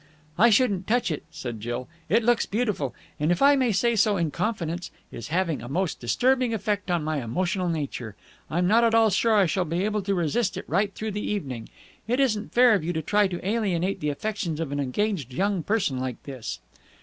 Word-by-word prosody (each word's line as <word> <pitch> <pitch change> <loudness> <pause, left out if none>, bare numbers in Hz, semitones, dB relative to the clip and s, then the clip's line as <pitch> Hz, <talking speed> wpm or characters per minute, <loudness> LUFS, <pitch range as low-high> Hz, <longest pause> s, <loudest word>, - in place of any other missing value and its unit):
"I 225 +7 +6
shouldn't 205 -5 +2
touch 235 -5 +1
it," 155 - -4
said 120 -3 -6
Jill. 120 +3 -4 0.2
"It 225 +6 +3
looks 240 0 +2
beautiful, 205 - -1 0.2
and, 150 +3 +1
if 175 - +1
I 285 +1 +6
may 255 -4 +2
say 235 +4 +2
so 210 -1 +3
in 165 -3 0
confidence, 175 -3 -2 0.2
is 115 -2 -7
having 170 -4 0
a 120 - -8
most 180 +4 -1
disturbing 250 - +2
effect 205 -3 -2
on 175 -3 +1
my 155 -2 -1
emotional 180 - -1
nature. 135 -9 -4 0.3
I'm 175 +3 +1
not 225 +4 +4
at 230 -1 +3
all 225 -1 +5
sure 220 +4 +3
I 200 -2 +5
shall 185 +2 0
be 175 +3 -1
able 210 0 0
to 200 0 -1
resist 180 +5 0
it - - -6
right 200 0 +1
through 220 0 -3
the 210 +1 -3
evening. 135 - -4 0.4
It 245 +3 +1
isn't 220 -6 +1
fair 245 -1 +6
of 195 -6 +1
you 175 +2 -2
to 160 -1 -2
try 205 +3 +3
to 180 0 -5
alienate 195 -4 0
the 150 - -1
affections 170 0 -3
of 160 -4 -3
an 145 - -2
engaged 145 - -1
young 195 -1 +1
person 175 - 0
like 130 -2 -4
this." 120 - -6
185 Hz, 215 wpm, -25 LUFS, 155-215 Hz, 0.4 s, I